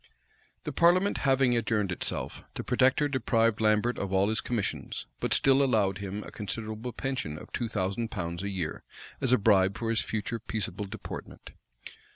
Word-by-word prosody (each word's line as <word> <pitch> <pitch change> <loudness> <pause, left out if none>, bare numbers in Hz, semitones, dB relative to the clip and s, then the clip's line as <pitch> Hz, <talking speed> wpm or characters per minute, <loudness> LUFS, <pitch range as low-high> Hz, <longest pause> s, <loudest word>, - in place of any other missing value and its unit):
The - - -3
parliament 180 +4 +4
having 135 -2 +4
adjourned 105 -4 0
itself, 90 - -3
the - - -3
protector 130 +3 +3
deprived 115 -5 +1
Lambert 110 +3 +2
of 100 -1 -3
all 95 +1 +3
his 110 - +1
commissions; 115 -5 -3
but - - -2
still 135 0 +5
allowed 100 -7 +2
him 100 +1 -4
a - - -10
considerable 110 +3 -4
pension 125 - -3
of - - -11
two 120 - -1
thousand 105 +2 -1
pounds 85 -5 -4
a 100 - -2
year, 90 -5 -3 0.4
as 130 - +1
a 125 - +6
bribe 100 -2 +4
for 115 -1 -1
his 115 - +2
future 110 +1 -3
peaceable 110 -2 -3
deportment. 100 +1 -8
110 Hz, 170 wpm, -29 LUFS, 100-120 Hz, 0.4 s, a